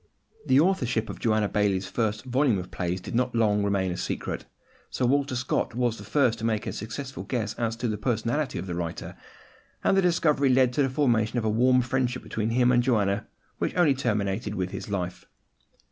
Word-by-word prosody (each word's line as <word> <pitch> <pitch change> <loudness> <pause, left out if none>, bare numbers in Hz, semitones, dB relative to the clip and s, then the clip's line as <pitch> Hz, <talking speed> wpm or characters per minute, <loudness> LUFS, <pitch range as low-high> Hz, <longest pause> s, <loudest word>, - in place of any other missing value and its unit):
The 135 - +5
authorship 130 - +1
of - - -10
Joanna 110 -2 +2
Baillie's 100 -2 0
first 110 0 -2
volume 130 -3 +2
of 90 -1 -6
plays 90 0 -2
did - - -7
not 125 +1 0
long 105 -2 +3
remain 100 -2 0
a 90 - -4
secret. - - -4 0.4
Sir 130 - -1
Walter 140 +1 +1
Scott 125 -2 -1
was 120 -2 0
the - - -9
first 115 +2 +1
to - - -8
make 110 -2 0
a - - -3
successful 130 +5 -6
guess 110 -4 -2
as 115 -1 -2
to 120 +1 -2
the 105 -2 -2
personality 120 +5 -1
of - - -4
the 90 - -4
writer; 85 -1 -5 0.7
and - - +3
the 195 - +4
discovery 155 -6 +2
led 130 -1 +4
to 145 - +1
the 135 - +2
formation 120 -4 +1
of 115 - 0
a - - +2
warm 125 +3 +4
friendship 125 0 -1
between 110 0 -2
him 125 +1 +3
and 120 -1 +4
Joanna, 105 -5 +1 0.3
which - - -1
only 175 -6 +4
terminated 105 -5 -1
with 90 -2 -2
his - - -6
life. 90 -3 -3
115 Hz, 205 wpm, -26 LUFS, 105-130 Hz, 0.7 s, The